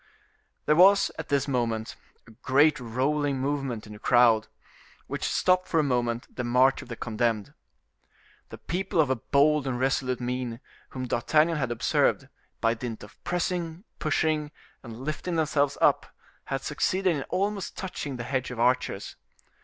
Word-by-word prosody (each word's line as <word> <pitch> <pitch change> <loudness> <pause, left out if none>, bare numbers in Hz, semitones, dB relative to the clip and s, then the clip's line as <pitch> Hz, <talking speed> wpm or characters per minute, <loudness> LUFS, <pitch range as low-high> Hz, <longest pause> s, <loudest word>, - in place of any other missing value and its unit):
There 150 - +4
was, 195 +4 +6
at 160 - -6
this 140 -1 +1
moment, 115 -4 -1 0.3
a 115 - -16
great 145 +6 +3
rolling 135 +4 0
movement 135 -4 -2
in 105 - -10
the 105 - -11
crowd, 115 -2 +4 0.6
which - - -5
stopped 185 0 +2
for 165 - +1
a - - +3
moment 120 -3 -1
the 125 - -3
march 125 +3 +3
of 130 - -12
the 120 - -5
condemned. 115 +2 -1 1.0
The - - -9
people 180 -1 -2
of 145 -4 +4
a - - +2
bold 140 +4 +2
and 125 -2 -2
resolute 130 -1 0
mien, 125 -1 -3 0.3
whom 130 -1 -5
D'Artagnan 155 +8 +2
had 130 -4 -1
observed, 120 - +1 0.3
by 115 0 +3
dint 115 -2 -6
of 105 - -15
pressing, 175 -1 -2 0.2
pushing, 155 -1 0 0.3
and 115 -1 -10
lifting 155 +5 -3
themselves 145 -3 +1
up, - - +3 0.4
had 135 -1 -3
succeeded 185 +4 0
in 140 - -3
almost 200 +1 -2
touching 150 -7 -5
the 120 - -5
hedge 130 +1 -2
of 125 -2 -7
archers. 120 -4 0
135 Hz, 160 wpm, -27 LUFS, 120-155 Hz, 1.0 s, was